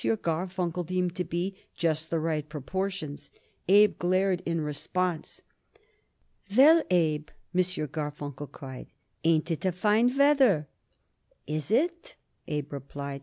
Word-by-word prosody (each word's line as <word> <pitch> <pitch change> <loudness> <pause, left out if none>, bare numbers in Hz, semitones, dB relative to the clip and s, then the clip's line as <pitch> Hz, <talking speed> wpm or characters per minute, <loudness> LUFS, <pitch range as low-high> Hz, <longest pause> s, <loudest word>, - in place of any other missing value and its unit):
Garfunkel 180 -2 -1
deemed 180 0 -1
to 180 - 0
be 175 +3 -3 0.2
just 160 -1 -1
the 165 - 0
right 155 -2 -2
proportions. 160 +1 -4 0.4
Abe 205 +3 +5
glared 185 +1 +2
in 165 -1 0
response. 165 +3 -3 1.1
"Well, 315 +5 +8
Abe," 155 -4 +1 0.2
M. 185 - +4
Garfunkel 150 -5 -4
cried, 130 -3 -9 0.4
"ain't 165 +1 +2
it 160 - -2
a 185 - +2
fine 215 +8 +2
weather?" 270 - +4 0.8
"Is 150 -1 -3
it?" 340 +10 0 0.3
Abe 150 -1 -3
replied. 140 0 -6
170 Hz, 120 wpm, -28 LUFS, 150-190 Hz, 1.1 s, Well